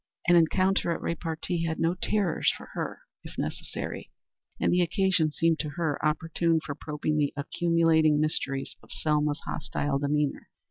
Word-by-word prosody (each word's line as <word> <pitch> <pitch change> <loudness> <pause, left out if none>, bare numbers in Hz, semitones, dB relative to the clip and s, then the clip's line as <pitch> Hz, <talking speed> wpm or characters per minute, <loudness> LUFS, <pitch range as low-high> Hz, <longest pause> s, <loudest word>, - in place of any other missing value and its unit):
An 175 - +6
encounter 185 +3 +3
at 170 - -1
repartee 165 +1 -2
had 160 -1 -2
no 165 +1 +2
terrors 190 -1 +1
for - - -12
her, - - -4 0.2
if - - -11
necessary, - - -4 0.5
and - - +2
the 180 - +4
occasion 180 -3 +2
seemed 165 +1 +2
to 155 - -2
her 160 -4 -1
opportune 165 +2 +1
for 150 -2 -5
probing 150 +1 -2
the 145 -2 +2
accumulating 160 0 +3
mysteries 140 -3 -1
of - - -18
Selma's 150 0 0
hostile 145 -1 -2
demeanor. 145 0 -1
160 Hz, 150 wpm, -28 LUFS, 150-170 Hz, 0.5 s, An